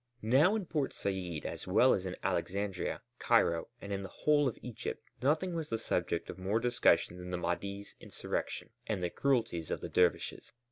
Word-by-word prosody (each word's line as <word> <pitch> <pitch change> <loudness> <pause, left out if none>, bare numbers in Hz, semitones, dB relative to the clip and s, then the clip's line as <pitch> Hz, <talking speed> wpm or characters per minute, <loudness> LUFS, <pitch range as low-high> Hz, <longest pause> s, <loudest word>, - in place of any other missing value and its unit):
Now 140 - +5
in 210 -4 -1
Port 150 -5 -1
Said 90 -5 -3
as - - -5
well - - +5
as - - -1
in - - -4
Alexandria, 100 -1 -1 0.2
Cairo, 85 -1 +3
and 100 0 -5
in 100 - -2
the 95 - -6
whole 145 +4 +3
of 120 - -2
Egypt 120 -3 -5 0.2
nothing 155 +7 +2
was 165 -2 -3
the 115 - 0
subject 85 -6 -1
of 95 - -7
more 100 +4 +1
discussion 120 -6 +3
than 90 0 -7
the 90 - -1
Mahdi's 100 +4 -3
insurrection - - -4 0.2
and 100 -4 -1
the 85 - 0
cruelties 115 - +1
of - - -1
the - - -6
dervishes. 90 -1 +1
100 Hz, 185 wpm, -33 LUFS, 90-135 Hz, 0.2 s, Now